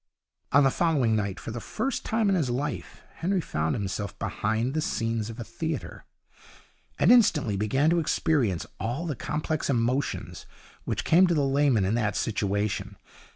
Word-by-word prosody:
On 140 Hz, +1 st, +6 dB
the 135 Hz, -, +4 dB
following 140 Hz, -10 st, +2 dB
night, 100 Hz, -3 st, -2 dB
for -, -, -6 dB
the 120 Hz, -, -5 dB
first 265 Hz, -, -3 dB
time 220 Hz, -1 st, +1 dB
in 195 Hz, -, +3 dB
his 160 Hz, -9 st, +1 dB
life, 140 Hz, +5 st, -4 dB
Henry 190 Hz, +3 st, 0 dB
found 75 Hz, -, -1 dB
himself 100 Hz, 0 st, -4 dB
behind 110 Hz, +5 st, -1 dB
the 155 Hz, -, 0 dB
scenes 115 Hz, -5 st, -1 dB
of 115 Hz, +2 st, -8 dB
a -, -, -3 dB
theatre, 160 Hz, +7 st, -5 dB, 0.9 s
and -, -, +5 dB
instantly 155 Hz, -, +4 dB
began 135 Hz, +10 st, +2 dB
to 170 Hz, -, +3 dB
experience 135 Hz, -, +1 dB
all 125 Hz, +9 st, -2 dB
the 155 Hz, -4 st, -2 dB
complex 150 Hz, +5 st, -2 dB
emotions 125 Hz, +1 st, -1 dB, 0.4 s
which -, -, -2 dB
come 180 Hz, +3 st, +5 dB
to 175 Hz, -, +1 dB
the 145 Hz, -2 st, +2 dB
layman 135 Hz, -7 st, +3 dB
in 95 Hz, -, 0 dB
that 105 Hz, -3 st, 0 dB
situation. 100 Hz, -1 st, -1 dB
130 Hz, 165 wpm, -27 LUFS, 110-155 Hz, 0.9 s, On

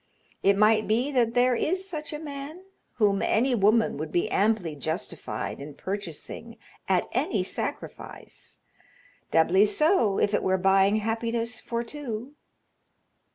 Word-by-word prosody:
It 200 Hz, 0 st, +4 dB
might 215 Hz, +1 st, +4 dB
be 240 Hz, +6 st, +1 dB
that 240 Hz, -4 st, +1 dB
there 250 Hz, +1 st, +4 dB
is 370 Hz, +9 st, -1 dB
such 310 Hz, -5 st, -5 dB
a 300 Hz, -, -4 dB
man 295 Hz, +3 st, -7 dB, 0.3 s
whom 205 Hz, -4 st, +2 dB
any 250 Hz, +4 st, +2 dB
woman 220 Hz, -2 st, +3 dB
would 155 Hz, +1 st, -5 dB
be 175 Hz, -, 0 dB
amply 200 Hz, -7 st, +1 dB
justified 160 Hz, 0 st, -4 dB
in 145 Hz, 0 st, -8 dB
purchasing 190 Hz, -5 st, -6 dB, 0.3 s
at -, -, +3 dB
any -, -, 0 dB
sacrifice -, -, -6 dB, 0.7 s
doubly 185 Hz, +6 st, +4 dB
so 225 Hz, -, +3 dB
if 205 Hz, -, +1 dB
it -, -, +2 dB
were 190 Hz, 0 st, +2 dB
buying 195 Hz, +2 st, +4 dB
happiness 230 Hz, +2 st, -2 dB
for 235 Hz, 0 st, -3 dB
two." 250 Hz, -1 st, -6 dB
220 Hz, 135 wpm, -27 LUFS, 195-250 Hz, 0.7 s, It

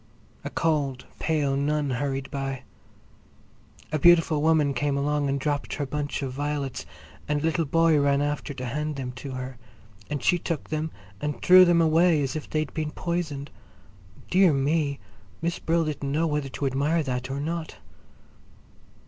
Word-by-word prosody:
A -, -, -4 dB
cold, 145 Hz, -6 st, 0 dB
pale 150 Hz, -4 st, +1 dB
nun 145 Hz, 0 st, 0 dB
hurried 135 Hz, +1 st, -2 dB
by. 135 Hz, -1 st, -3 dB, 1.3 s
A 155 Hz, -, 0 dB
beautiful 165 Hz, -2 st, +5 dB
woman 155 Hz, -3 st, +3 dB
came 145 Hz, 0 st, 0 dB
along 145 Hz, 0 st, 0 dB
and 140 Hz, 0 st, 0 dB
dropped 145 Hz, +1 st, -2 dB
her 145 Hz, -, -2 dB
bunch 145 Hz, +1 st, -3 dB
of 130 Hz, -2 st, -3 dB
violets, 145 Hz, -1 st, -3 dB, 0.4 s
and 150 Hz, 0 st, +1 dB
a -, -, -1 dB
little 165 Hz, 0 st, +1 dB
boy 165 Hz, +1 st, +3 dB
ran 140 Hz, 0 st, +3 dB
after 145 Hz, 0 st, -2 dB
to 130 Hz, -1 st, -5 dB
hand 150 Hz, +4 st, -2 dB
them 130 Hz, -2 st, -4 dB
to 130 Hz, +2 st, -7 dB
her, 130 Hz, -1 st, -6 dB, 0.5 s
and 145 Hz, -3 st, -3 dB
she 175 Hz, -, +3 dB
took 165 Hz, -3 st, -4 dB
them 155 Hz, +1 st, -1 dB, 0.3 s
and 150 Hz, 0 st, -3 dB
threw 185 Hz, 0 st, +9 dB
them 170 Hz, -1 st, +4 dB
away 160 Hz, -1 st, +4 dB
as 135 Hz, -, -3 dB
if 155 Hz, -, -5 dB
they'd 155 Hz, -2 st, -2 dB
been 155 Hz, -1 st, -2 dB
poisoned. 155 Hz, -4 st, -3 dB, 0.8 s
Dear 185 Hz, -3 st, +5 dB
me! 140 Hz, +1 st, +1 dB, 0.4 s
Miss 170 Hz, +1 st, -2 dB
Brill 165 Hz, 0 st, +1 dB
didn't 145 Hz, -2 st, -3 dB
know 155 Hz, +3 st, +1 dB
whether 150 Hz, -3 st, -1 dB
to 140 Hz, -, -4 dB
admire 145 Hz, +5 st, +1 dB
that 125 Hz, -1 st, -3 dB
or 135 Hz, +1 st, -3 dB
not! 160 Hz, +2 st, -4 dB
145 Hz, 165 wpm, -26 LUFS, 140-160 Hz, 1.3 s, threw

